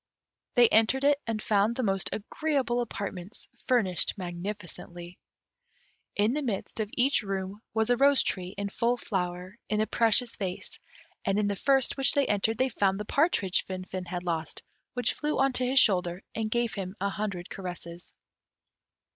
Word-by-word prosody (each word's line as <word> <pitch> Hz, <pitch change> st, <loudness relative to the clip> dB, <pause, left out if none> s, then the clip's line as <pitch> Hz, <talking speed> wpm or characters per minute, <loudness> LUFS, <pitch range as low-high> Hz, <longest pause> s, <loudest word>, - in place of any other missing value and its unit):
They 245 Hz, -2 st, +7 dB
entered 225 Hz, +5 st, +3 dB
it, 285 Hz, 0 st, +4 dB
and 225 Hz, -1 st, -1 dB
found 210 Hz, +2 st, +2 dB
the 255 Hz, -, -1 dB
most 195 Hz, -2 st, 0 dB
agreeable 255 Hz, +2 st, -1 dB
apartments, 200 Hz, -3 st, -5 dB, 0.2 s
furnished 215 Hz, -7 st, +2 dB
magnificently. 175 Hz, -1 st, -7 dB, 1.0 s
In 210 Hz, +4 st, +2 dB
the 300 Hz, -, -1 dB
midst 230 Hz, -4 st, -3 dB
of 215 Hz, -2 st, -1 dB
each 265 Hz, +3 st, +3 dB
room 195 Hz, 0 st, -4 dB
was 220 Hz, +2 st, +2 dB
a 245 Hz, -, +4 dB
rose 280 Hz, +1 st, +5 dB
tree 185 Hz, 0 st, -3 dB
in 200 Hz, 0 st, -2 dB
full 240 Hz, +4 st, +1 dB
flower, 185 Hz, 0 st, -3 dB
in 210 Hz, -, +1 dB
a 215 Hz, -, +3 dB
precious 230 Hz, +2 st, +2 dB
vase; 185 Hz, -3 st, -5 dB, 0.4 s
and 195 Hz, 0 st, +1 dB
in 210 Hz, -, +2 dB
the 200 Hz, -, 0 dB
first 270 Hz, +6 st, +2 dB
which 270 Hz, -2 st, +3 dB
they 285 Hz, -1 st, +3 dB
entered, 210 Hz, +1 st, +1 dB
they 260 Hz, +1 st, +2 dB
found 200 Hz, -4 st, +1 dB
the 210 Hz, -, -4 dB
partridge 210 Hz, -, +2 dB
Finfin 185 Hz, -1 st, -5 dB
had 180 Hz, -1 st, -4 dB
lost, 165 Hz, -3 st, -3 dB, 0.3 s
which 245 Hz, -, +3 dB
flew 300 Hz, 0 st, -2 dB
on 270 Hz, -1 st, +3 dB
to 250 Hz, 0 st, +3 dB
his 265 Hz, +1 st, +5 dB
shoulder 180 Hz, -4 st, +3 dB
and 220 Hz, -1 st, -2 dB
gave 235 Hz, 0 st, 0 dB
him 190 Hz, -1 st, -5 dB
an 200 Hz, +1 st, 0 dB
hundred 200 Hz, -4 st, -4 dB
caresses. 175 Hz, -2 st, -7 dB
210 Hz, 170 wpm, -28 LUFS, 185-245 Hz, 1.0 s, They